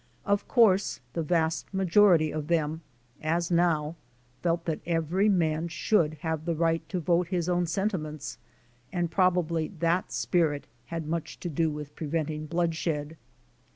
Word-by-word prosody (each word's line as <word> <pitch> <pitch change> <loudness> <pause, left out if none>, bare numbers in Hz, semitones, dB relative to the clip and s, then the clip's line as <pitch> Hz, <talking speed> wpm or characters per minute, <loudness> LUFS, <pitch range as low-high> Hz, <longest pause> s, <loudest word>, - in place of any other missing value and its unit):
Of 200 -1 +1
course, 210 -6 +4
the 170 - -1
vast 160 0 0
majority 185 -4 +4
of 150 -1 -3
them, 160 -1 0 0.4
as 165 +2 0
now, 165 -2 +2 0.4
felt 170 -1 0
that 160 -2 -1
every 170 +4 +1
man 165 -4 +1
should 165 -2 +1
have 160 -1 -2
the 170 -1 0
right 165 0 +1
to 185 - -1
vote 175 +1 +2
his 175 -2 -1
own 175 -1 +1
sentiments, 160 - -3 0.5
and 175 -2 -1
probably 175 -4 +2
that 170 +3 +1
spirit 155 -5 +1 0.2
had 165 -1 -4
much 165 0 -3
to 175 - -3
do 160 +1 +1
with 150 -1 -7
preventing 155 0 -2
blood 170 +1 0
shed. 150 -3 -2
582 - - -12
D. - - -19
165 Hz, 155 wpm, -28 LUFS, 155-175 Hz, 0.5 s, course